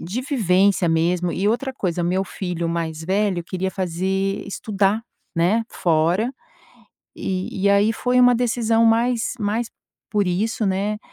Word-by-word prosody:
de 195 +9 -4
vivência 200 - +2
mesmo. 170 +2 +1
E, 200 +2 0
outra 255 +4 -1
coisa, 180 -8 -2
meu 185 +3 +1
filho 175 -3 -4
mais 165 -1 -3
velho 190 0 0
queria 185 +2 -3
fazer 190 +2 -2
estudar, 205 +1 0 0.3
né, 200 +7 +2
fora, 175 +8 +1 0.9
e 185 +1 -3
e 200 - +5
aí, 200 +2 +4
foi 250 +3 0
uma 245 0 +6
decisão 230 -1 +2
mais 230 +1 +2
mais 220 +3 -1 0.4
por 205 -2 +1
isso, 210 +5 0
né, 200 +2 -1
195 Hz, 140 wpm, -22 LUFS, 180-225 Hz, 0.9 s, uma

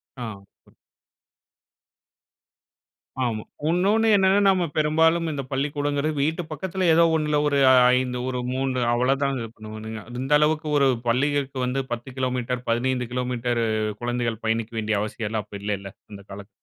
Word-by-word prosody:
ஆ. 125 -2 -6 3.0
ஆமா. 110 -3 -2 0.3
இன்னொன்னு 200 +6 +2
என்னன்னா 190 0 +4
நம்ம 190 -2 +3
பெரும்பாலும் 160 +2 +3
இந்த 140 -2 -4
பள்ளிக்கூடங்கிறது 145 +2 -1
வீட்டு 160 +4 -1
பக்கத்தில 185 +2 -2
ஏதோ 170 +1 +5
ஒண்ணுல 150 -1 +1
ஒரு 140 -1 +2 0.4
5 125 -1 -1
ஒரு 125 -1 -2
3 130 -1 -1
அவ்ளோதான் 135 +3 +1
இது 115 - -5
பண்ணுவாங்க. 110 0 -8 0.2
இந்த 135 +3 0
அளவுக்கு 155 +1 +1
ஒரு 140 -1 +4 0.2
பள்ளிகளுக்கு 140 +2 0
வந்து 130 +2 -1
10 120 +2 -6
கிலோமீட்டர், 125 -1 -2
15 125 +1 0
கிலோமீட்டர் 125 -1 -1 0.4
குழந்தைகள் 120 -2 -2
பயணிக்க 115 +1 -1
வேண்டிய 110 -1 0
அவசியம் 105 0 -4
எல்லாம் 110 -2 -3
அப்போ 100 - -9
இல்லைல்ல 100 -2 -3 0.2
அந்த 100 - -9
காலத்துல. 100 0 -9
130 Hz, 135 wpm, -24 LUFS, 115-150 Hz, 3.0 s, ஏதோ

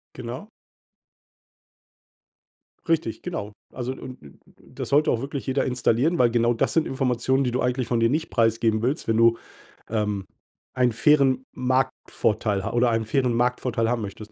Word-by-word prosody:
Genau. 125 - -7 2.4
Richtig, 165 0 0
genau. 110 - -5 0.2
Also, 125 0 -4
und 130 -1 -9
und 70 -2 -16 0.2
das - - -8
sollte 150 +2 +4
auch 115 - 0
wirklich 140 0 -5
jeder 135 +1 0
installieren, 125 +6 +1
weil 120 -2 +4
genau 120 0 +2
das 115 - -1
sind 165 - +2
Informationen, 130 0 0
die 125 - 0
du 125 - -1
eigentlich 125 0 0
von 120 - +1
dir 115 +1 +3
nicht 155 +3 -1
preisgeben 115 -1 +1
willst, 130 +3 -1
wenn 110 - +2
du, 115 0 +4 0.5
ähm, 105 -3 -1 0.5
einen 125 -1 +2
fairen 130 +1 +3
Marktvorteil 125 -5 0
ha 110 - -2
oder 120 +1 +3
einen 115 -1 0
fairen 125 +1 +1
Marktvorteil 120 -1 0
haben 120 -1 0
möchtest. 105 +1 -8
125 Hz, 160 wpm, -24 LUFS, 115-130 Hz, 2.4 s, sollte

